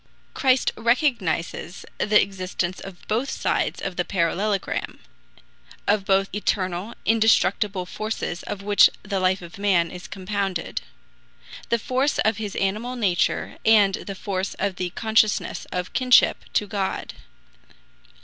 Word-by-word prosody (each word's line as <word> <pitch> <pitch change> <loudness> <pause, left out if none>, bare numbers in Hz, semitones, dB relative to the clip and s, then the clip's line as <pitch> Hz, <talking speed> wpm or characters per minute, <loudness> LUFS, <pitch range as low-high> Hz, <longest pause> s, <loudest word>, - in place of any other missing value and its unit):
Christ 260 -2 +2
recognizes 225 - 0
the 210 0 +4
existence 185 -2 -2
of 190 -2 -11
both 235 +6 0
sides - - -1
of 185 -2 -4
the 180 - +2
parallelogram, 195 +3 -1 0.9
of 205 -1 +2
both 195 0 +3
eternal 190 0 -2
indestructible 210 -3 +2
forces 215 -2 -4
of 200 -1 -6
which 205 0 +6
the 200 -2 -2
life 185 0 +1
of 175 +3 -11
man 185 -5 +2
is 180 0 -9
compounded: 195 -2 -3 0.9
the 235 - +3
force 260 +5 0
of 220 -1 +2
his 210 -2 -5
animal 215 +6 -1
nature 195 -8 0
and 210 -3 +5
the 195 +1 -5
force 190 -1 -3
of 195 -2 -2
the 180 -1 -2
consciousness 220 +2 +1
of 180 0 -3
Kinship 255 -1 +4
to 210 - +2
God. 200 -2 -3
200 Hz, 130 wpm, -24 LUFS, 185-220 Hz, 0.9 s, which